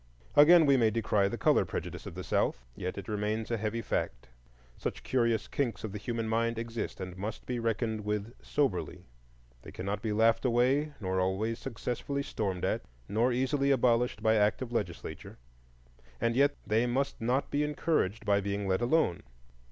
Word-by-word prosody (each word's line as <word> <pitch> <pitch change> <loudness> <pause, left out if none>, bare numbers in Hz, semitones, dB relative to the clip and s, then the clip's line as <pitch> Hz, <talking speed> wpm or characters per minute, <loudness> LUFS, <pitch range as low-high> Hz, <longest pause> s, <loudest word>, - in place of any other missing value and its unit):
Again, 160 +3 +8
we 140 -2 +5
may 115 -3 +4
decry 105 -2 +1
the - - -3
color - - +4
prejudice - - -5
of - - -8
the - - -5
South, 60 +2 0
yet 90 +1 -4
it 100 - -6
remains 105 +1 -2
a 115 - +1
heavy 110 +2 -2
fact. - - -3 0.5
Such - - -5
curious 115 -4 +1
kinks 120 -7 -2
of 110 - -4
the 105 - -5
human 115 +1 -3
mind 115 +1 0
exist 115 0 -4
and 95 -1 -6
must 105 +4 -5
be 125 -1 -2
reckoned 110 -1 -1
with 105 +2 -2
soberly. 135 -11 -1 0.6
They - - -11
cannot 100 +2 -3
be 110 - -2
laughed 115 +2 +3
away, 130 +5 +2
nor 95 -2 -1
always 95 +5 0
successfully 135 +3 -3
stormed 95 -9 -2
at, - - 0 0.3
nor 115 +5 +2
easily 135 +3 +1
abolished 125 -2 +2
by 110 0 +4
act 105 +4 +2
of 120 - -8
legislature. 105 -8 -4 0.8
And 115 0 +1
yet 140 +2 +4
they 110 +3 +2
must 135 +2 -1
not 125 +4 0
be 145 - +1
encouraged 150 - 0
by 100 -1 +3
being 100 0 -2
let 95 +2 +1
alone. 120 - +2
115 Hz, 175 wpm, -30 LUFS, 105-125 Hz, 0.8 s, Again